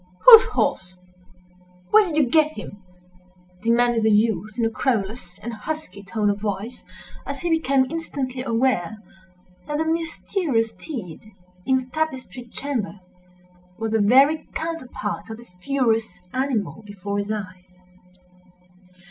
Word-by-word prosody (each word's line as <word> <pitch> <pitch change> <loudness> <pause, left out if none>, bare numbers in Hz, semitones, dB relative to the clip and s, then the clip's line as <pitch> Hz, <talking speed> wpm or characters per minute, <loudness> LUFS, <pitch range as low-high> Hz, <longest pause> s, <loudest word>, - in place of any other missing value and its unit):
"Whose 465 -1 +11
horse? 185 - -1 0.9
Where 430 0 +7
did 310 -3 -3
you 295 -4 +4
get 310 +3 +3
him?" 200 - -9 0.8
demanded 235 +1 +3
the 220 - +3
youth, 215 0 +1
in 230 - +1
a - - +2
querulous 215 -6 -2
and 235 +1 -6
husky 225 -3 -6
tone 205 +2 0
of 200 - -4
voice, 210 +3 -4 0.4
as - - -6
he 345 -1 -1
became 275 -5 +3
instantly 275 -6 -4
aware 230 -5 0 0.7
that 295 0 -2
the 320 - 0
mysterious 325 - -1
steed 215 - -8 0.4
in 265 - +4
the 260 -1 0
tapestried 255 -7 -4
chamber 240 -8 -3 0.8
was 225 -1 -3
the 220 -1 +2
very 270 +9 +4
counterpart 260 -11 -4
of 220 - -6
the 240 - -13
furious 225 -6 0
animal 225 - -1
before 205 0 -4
his 200 +1 -3
eyes. 185 -3 -7
235 Hz, 130 wpm, -23 LUFS, 205-280 Hz, 0.9 s, Whose